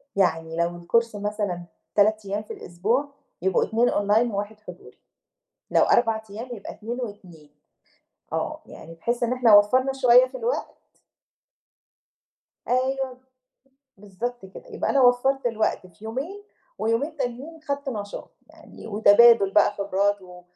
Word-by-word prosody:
يعني 165 -4 0
لو 175 0 -1
الCourse 230 +5 0
مثلًا 205 -4 -3 0.3
3 215 0 +3
أيام 205 +2 -3
في - - -8
الأسبوع، 230 +12 -2 0.3
يبقوا 190 0 +2
2 235 +2 +1
Online 210 +3 +1
وواحد 205 +2 -4
حضوري. 215 - -13 0.7
لو - - +4
4 225 -2 +2
أيام، 225 +5 -7
يبقى 200 - -9
2 235 +4 -6
و2. 180 -9 -9 0.8
آه. - - -3
يعني 165 +1 -12
بحيث 235 +9 -3
إن 240 +1 +1
إحنا 245 -4 +5
وفَّرنا 255 +6 +4
شوية 255 -1 +5
في - - -9
الوقت 485 +1 -3 1.9
أيوه 260 +1 0
ب - - -21 0.8
بالضبط 210 +2 -6
كده. 190 - -13
يبقى - - -2
أنا 275 - +3
وفَّرت 250 +2 +3
الوقت 220 -4 -1
في 180 +4 -18
يومين 290 - -5 0.4
ويومين 260 +8 -1
تانيين 275 +5 -5
خدت 280 -1 -4
نشاط، 205 -4 -6 0.2
يعني - - -14
وتبادُل 215 0 +6
بقى 210 0 +4
خبرات 200 0 0
و 180 -1 -13
220 Hz, 135 wpm, -24 LUFS, 200-250 Hz, 1.9 s, وتبادُل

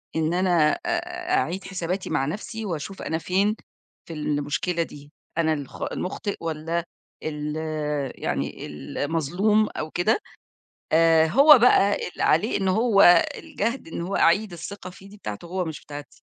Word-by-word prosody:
إن 160 +1 +1
أنا 175 -4 +3
أ 355 +1 -2
أعيد 190 - -1
حساباتي 185 0 -3
مع 135 - +1
نفسي 215 +7 -5
وأشوف 185 +1 -5
أنا 160 - -2
فين 195 +5 +1 0.5
في 165 - -8
المشكلة 150 +3 -1
دي، 145 -2 -12 0.3
أنا 160 -1 +2
الخ 145 -3 -7
المخطئ 200 +2 -3
والّا 165 +1 -2 0.4
ال 150 0 -3 0.7
يعني - - -2
المظلوم 165 - 0
أو 155 0 -4
كده. 195 - +2 0.7
آآ، 165 0 +5
هو 280 - +8
بقى 205 -4 +5
اللي - - -6
عليه 170 +9 +3
إن 190 - +1
هو 200 -3 +6
الجهد 230 0 -3
إن 165 - -5
هو 180 +3 -2
أعيد 200 +4 +3
الثقة 185 +2 -7
فيه 190 +2 -14
دي 210 - -13
بتاعته 105 - -7
هو 180 +1 -2
مش 160 -2 -6
بتاعتي. 145 -2 -10
175 Hz, 145 wpm, -24 LUFS, 155-205 Hz, 0.7 s, هو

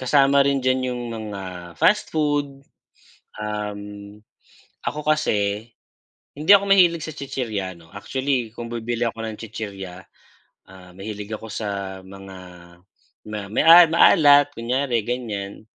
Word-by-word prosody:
kasama 140 +1 +4
rin 140 -1 +1
diyan 130 0 +2
yung 125 - -5
mga 95 -5 -7
fast - - +2
food, 145 -3 -1 0.8
um. 105 -1 -4 1.0
Ako 150 0 -4
kasi, 105 -7 0 0.7
hindi 155 +6 +4
ako 200 -1 +7
mahilig 175 -4 +5
sa 155 - -6
chichirya 115 -10 -4
'no. 80 -1 -18
Actually 125 +3 -2
kung 115 0 -7
bibili 120 0 -4
ako 115 0 -7
ng 110 -1 -5
chichirya, 95 -5 -8 0.6
ah, 95 -1 -15
mahilig 105 +1 -7
ako 110 +1 -6
sa 100 -3 -5
mga 95 0 -11 0.9
ma 105 0 -5
may 105 - 0 0.2
maalat 145 -3 +5
kunyari 125 0 -1
gan'yan. 105 -5 -4
115 Hz, 120 wpm, -22 LUFS, 100-140 Hz, 1.0 s, ako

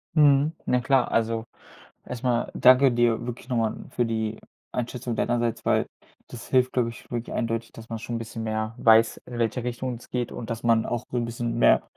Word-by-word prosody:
Mhm. 145 -1 +5 0.2
Na 125 - +3
klar. 135 0 +2
Also, 115 0 +1 0.6
erstmal 125 -1 -1
danke 130 +2 +6
dir 120 -1 +2
wirklich 120 +1 -7
nochmal 115 -3 0
für 120 - 0
die 110 -1 -2 0.3
Einschätzung 125 0 -3
deinerseits, 120 -1 0
weil - - +3 0.4
das 120 - -9
hilft, 130 -1 +3
glaube 125 -2 +1
ich, 115 - -11
wirklich 120 -1 -4
eindeutig, 115 -1 -2
dass 115 0 -12
man 115 - -3
schon 115 +1 -4
'n - - -2
bisschen 115 0 -6
mehr 110 0 -2
weiß, 115 -1 +5
in 120 -1 -7
welche 115 +1 0
Richtung 125 0 -3
es 115 - -15
geht 125 -1 -2
und 115 - -7
dass 115 0 -4
man 115 -1 +3
auch 120 -2 -2
so 125 - -1
'n 120 - -1
bisschen 115 0 -3
mehr - - +5
120 Hz, 200 wpm, -25 LUFS, 115-125 Hz, 0.6 s, danke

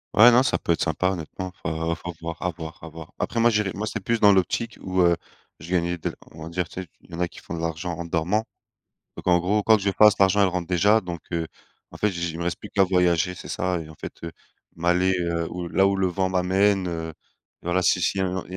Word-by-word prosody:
Ouais, 120 +3 +9
non 120 +1 +6
ça 135 - +1
peut - - -2
être 85 - +1
sympa 90 +3 +1
honnêtement, 90 +1 -6
faut 80 +1 -2
faut 85 +1 -6
voir, 85 0 -6
à 90 - 0
voir, 80 0 -8
à - - -7
voir. 80 0 -11
Après 115 - -1
moi 120 +1 +5
j'irai 105 -3 +1
moi 105 +3 -3
c'est 110 - -3
plus 115 +2 0
dans 105 -1 +7
l'optique 100 +5 0
où, 95 0 0
heu, 85 -1 +5 0.4
je 80 - -11
gagnais 90 -1 0
de - - -4 0.2
on 80 - -13
va 80 - -7
dire, 85 +1 -2
tu 95 - -7
sais? 90 - -9
Il - - -21
y - - -12
en 85 - -6
a 90 - +1
qui - - -17
font - - -8
de 85 - -5
l'argent 85 +1 -3
en 85 +1 -5
dormant, 85 +6 0 0.8
donc - - -9
en 90 -1 +5
gros, 100 +5 +1
quoi 110 +1 +5
que 105 - -6
je 100 - +2
fasse, 105 +2 +6
l'argent 100 +1 +4
elle 100 - +5
rentre 90 -1 -3
déjà, 100 +5 +3
donc 90 -2 -6
heu, 85 -1 -1 0.4
en - - -11
fait, 105 - +2
j 85 -2 -5
j 85 -1 -1
il 80 - -7
me 85 - -3
reste 85 - -2
plus 105 - -10
qu'à 100 -2 +4
voyager. 90 -1 +2
C'est - - -10
ça, 90 -1 -1
et 80 -1 -9
en - - -12
fait, - - -8
heu, 85 - -6 0.4
m'aller, 90 +2 +2
heu, 85 -1 -1
où 90 -1 -5
là 95 +3 +3
où 100 - +2
le 95 -1 +1
vent 95 +1 -1
m'amène, 95 +1 +2
heu, 80 -1 -4
et - - -11 0.5
voilà. 90 +1 +1
Si - - +3
s'il 95 - 0
y - - +1
a - - +1
un 95 0 -3
il 90 - -8
y - - -3
90 Hz, 290 wpm, -24 LUFS, 85-95 Hz, 0.8 s, Ouais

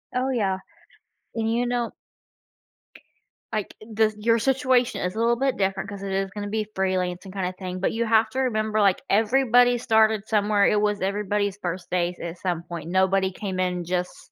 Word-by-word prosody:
Oh, 255 +1 +1
yeah. 200 -7 0 0.8
And, 225 -1 0
you 240 +2 +1
know 240 -1 -1 1.6
Like, 215 -2 -2
the 215 0 0
your 230 +2 +2
situation 255 0 +2
is 180 +2 -2
a - - -3
little 235 +1 +2
bit 270 +1 +1
different 195 0 -1
'cause 200 -1 -7
it 195 - -4
is 195 0 -1
gonna 205 0 -5
be 215 0 -1
freelancing 185 -1 -1
kinda 185 -1 -3
thing, 185 -1 -5
but 190 - 0
you 230 +1 0
have 220 0 +3
to 260 - -3
remember, 215 -4 0
like, 195 -2 +3
everybody 245 +3 +4
started 220 -2 +2
somewhere, 210 -1 +2
it 210 - +2
was 210 -1 +1
everybody's 205 0 -1
first 175 -1 -4
days 175 0 -1
at 170 +1 -6
some 175 -3 -2
point, 170 -2 -7
nobody 190 +1 +2
came 190 -1 -5
in 180 -1 -1
just 180 +1 -4
205 Hz, 180 wpm, -24 LUFS, 185-225 Hz, 1.6 s, everybody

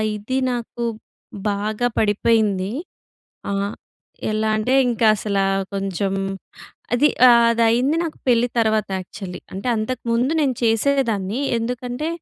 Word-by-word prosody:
ఇది 230 +6 -3
నాకు 240 0 -4 0.7
బాగా 210 +4 -1
పడిపోయింది. 210 -2 +2 0.8
ఆహ్, 200 +1 -1 0.6
ఎలా 215 0 0
అంటే 250 +5 0 0.2
ఇంకా 230 -1 +2
అసల 200 -1 -2 0.3
కొంచెం 195 0 -2 0.8
అది 290 +5 +4 0.2
ఆహ్, 235 -1 +6
అది 230 0 +1
అయింది 255 +7 +2
నాకు 325 -2 -4
పెళ్ళి 240 -1 +4
తర్వాత 220 -2 +2
యాక్చువల్లి. 185 0 -8
అంటే 195 +5 -6
అంతకుముందు 235 +4 -1
నేను 270 -4 +1
చేసేదాన్ని. 225 -2 +1 0.2
ఎందుకంటే 245 +5 -3
225 Hz, 115 wpm, -21 LUFS, 205-245 Hz, 0.8 s, ఆహ్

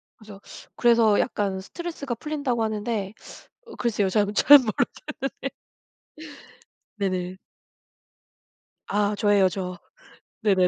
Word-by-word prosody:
그래서, 210 -3 -13 0.4
그래서 230 -3 +4
약간 200 -5 -1
스트레스가 285 - -6
풀린다고 270 -3 -2
하는데 215 -2 -2 0.5
어 460 - -11
글쎄요 215 -5 0
전 205 +1 +1
잘 290 +7 +9
모르겠는데. 225 -6 0 2.1
네네. 185 -2 -2 1.5
아 205 0 0
저예요 205 -2 +3
저. 180 -1 -5 0.6
네네네. 190 -4 +3
210 Hz, 230 characters per minute, -25 LUFS, 195-235 Hz, 2.1 s, 잘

